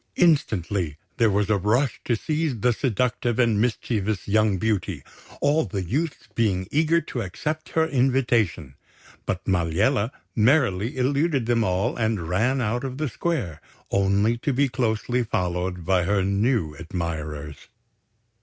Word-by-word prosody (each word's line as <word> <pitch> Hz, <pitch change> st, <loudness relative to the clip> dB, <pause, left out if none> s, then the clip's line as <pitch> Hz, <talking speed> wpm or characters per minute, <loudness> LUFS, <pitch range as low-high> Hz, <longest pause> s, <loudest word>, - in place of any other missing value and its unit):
Instantly, 100 Hz, -, +1 dB, 0.2 s
there 115 Hz, -2 st, +4 dB
was 100 Hz, 0 st, +1 dB
a 105 Hz, -, +4 dB
rush 110 Hz, +7 st, +1 dB
to 120 Hz, -, +2 dB
seize 150 Hz, -2 st, -2 dB
the 125 Hz, +1 st, +3 dB
seductive 120 Hz, -1 st, 0 dB
and 115 Hz, -4 st, +3 dB
mischievous 110 Hz, -3 st, -1 dB
young 105 Hz, -1 st, +3 dB
beauty, 95 Hz, -7 st, -1 dB, 0.4 s
all 150 Hz, +3 st, +3 dB
the 95 Hz, -3 st, -3 dB
youths 145 Hz, -, -2 dB
being 95 Hz, -5 st, 0 dB
eager 160 Hz, +3 st, +3 dB
to 125 Hz, -, -5 dB
accept 150 Hz, -, -4 dB
her 160 Hz, -, +5 dB
invitation; 120 Hz, -, +1 dB, 0.5 s
but 90 Hz, -, -2 dB
Maliella 100 Hz, -, +1 dB, 0.3 s
merrily 115 Hz, -2 st, +2 dB
eluded 140 Hz, +1 st, +1 dB
them 115 Hz, -1 st, +2 dB
all 95 Hz, +5 st, 0 dB
and 110 Hz, -7 st, -1 dB
ran 120 Hz, +10 st, +1 dB
out 120 Hz, +2 st, -1 dB
of 130 Hz, -1 st, -4 dB
the 155 Hz, +1 st, -1 dB
square, 125 Hz, -, -3 dB, 0.3 s
only 100 Hz, +4 st, +2 dB
to 145 Hz, +3 st, -1 dB
be 140 Hz, +2 st, +2 dB
closely 125 Hz, -1 st, 0 dB
followed 90 Hz, -4 st, -2 dB
by 95 Hz, -1 st, +3 dB
her 100 Hz, 0 st, +1 dB
new 100 Hz, -, +1 dB
admirers. 80 Hz, -3 st, -5 dB
110 Hz, 140 wpm, -24 LUFS, 95-130 Hz, 0.5 s, her